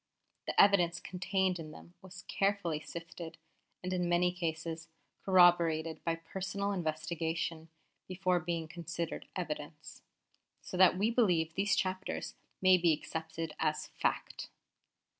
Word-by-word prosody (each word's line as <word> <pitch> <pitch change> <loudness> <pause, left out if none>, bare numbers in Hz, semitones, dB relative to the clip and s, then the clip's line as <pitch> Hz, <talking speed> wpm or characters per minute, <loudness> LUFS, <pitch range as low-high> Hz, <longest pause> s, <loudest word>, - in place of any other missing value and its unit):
The - - 0
evidence 175 -4 +5
contained 185 0 -1
in 155 -1 -7
them 170 +3 -13
was 185 -1 -11
carefully 195 -6 0
sifted, 165 +1 -8 0.5
and 185 +1 -2
in 180 -1 0
many 175 +1 +3
cases 165 -1 -4 0.3
corroborated 170 -4 +4
by 165 -1 0
personal 190 +4 -3
investigation, 160 -1 -2 0.4
before 185 -1 +1
being 165 -1 -3
considered 170 0 -5
evidence: 150 -3 -6 0.6
so - - -8
that 180 0 +6
we 210 +4 +2
believe 175 -9 +2
these 195 +2 +2
chapters 185 0 -2 0.3
may 185 -1 +7
be 170 -2 +4
accepted 160 +1 -4
as 155 -1 0
fact. - - -1
175 Hz, 120 wpm, -33 LUFS, 160-185 Hz, 0.6 s, may